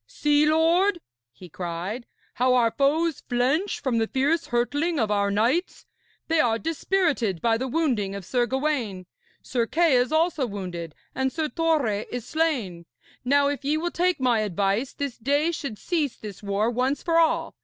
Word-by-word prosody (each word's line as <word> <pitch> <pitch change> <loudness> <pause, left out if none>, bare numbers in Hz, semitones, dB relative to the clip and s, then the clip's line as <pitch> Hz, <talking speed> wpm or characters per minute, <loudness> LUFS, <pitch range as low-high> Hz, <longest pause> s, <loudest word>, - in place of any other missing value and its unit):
'See, 295 0 +2
lord,' 340 +5 +3 0.3
he 180 +10 -13
cried, 180 +8 -5 0.3
'how 255 +1 +2
our 235 -2 +3
foes 305 +4 +1
flinch 270 +10 +1
from 250 -5 0
the 225 - +1
fierce 285 +7 0
hurtling 290 +7 0
of 220 -3 0
our 200 -1 +1
knights. 235 - 0 0.4
They 325 0 +2
are 225 -5 +3
dispirited 315 - 0
by 225 +2 +1
the 260 - -2
wounding 240 -10 0
of 200 -2 -7
Sir 245 +2 0
Gawaine. 260 -9 -2 0.4
Sir 235 -3 -1
Kay 330 -1 +3
is 250 +3 +2
also 315 -4 +1
wounded, 180 -6 -6 0.2
and 265 0 -1
Sir 315 0 -2
Torre 295 -12 0
is 245 -2 -4
slain. 245 - -1 0.4
Now, 280 +3 +3
if 285 0 -3
ye 295 +3 +1
will 345 +2 -2
take 360 -1 +1
my 250 -3 +2
advice, 205 +4 0
this 280 -4 -5
day 285 +7 +1
should 275 -9 -5
cease 310 - -2
this 205 -3 -9
war 205 +3 0
once 255 +4 -1
for 335 -1 +3
all. 325 -1 +1
260 Hz, 170 wpm, -25 LUFS, 220-315 Hz, 0.4 s, lord